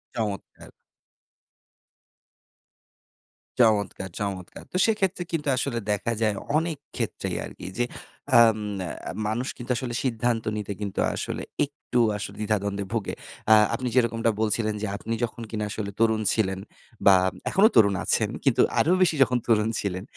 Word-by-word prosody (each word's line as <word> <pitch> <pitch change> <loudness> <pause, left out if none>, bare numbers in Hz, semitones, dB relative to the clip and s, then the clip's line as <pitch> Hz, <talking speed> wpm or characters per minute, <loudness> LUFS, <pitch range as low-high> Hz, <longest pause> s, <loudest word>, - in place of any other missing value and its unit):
চমৎকার! 105 -3 -4 2.9
চমৎকার, 100 -5 +2
চমৎকার! 95 -3 -5
তো 185 - -1
সেক্ষেত্রে 195 -5 +1
কিন্তু 150 -3 -2
আসলে 125 -3 -1
দেখা 105 +3 0
যায় 105 -2 +2 0.2
অনেক 160 -2 -1 0.2
ক্ষেত্রেই - - -3
আরকি - - -9
যে, 120 - +2 0.5
আম 110 -2 +6 0.5
আ - - -3 0.2
মানুষ 120 +5 -1
কিন্তু 120 0 -5
আসলে 120 -1 -4
সিদ্ধান্ত 120 -2 0
নিতে 105 -1 -4
কিন্তু 100 -2 -3 0.2
আসলে - - -4 0.2
একটু 140 -3 -3 0.2
আসলে 100 - -6
দ্বিধাদ্বন্দ্বে 100 -1 -1
ভোগে। 110 -5 -2 0.4
আ - - +11 0.2
আপনি 125 +1 -3
যেরকমটা 115 -2 +2
বলছিলেন 110 0 +1
যে, 110 - -1
আপনি 115 +1 -4
যখন 120 0 -3
কিনা 105 -1 -2
আসলে 105 -2 -4
তরুণ 110 -1 +3
ছিলেন 95 -3 0 0.5
বা 100 -1 +9 0.3
এখনো 205 +3 +6
তরুণ 100 -2 +6
আছেন, - - +1
কিন্তু - - +4 0.2
আরো 170 - +3
বেশি 165 -3 +4
যখন 125 0 0
তরুণ 110 -1 +3
ছিলেন, 95 -1 -3
110 Hz, 140 wpm, -26 LUFS, 105-125 Hz, 2.9 s, আ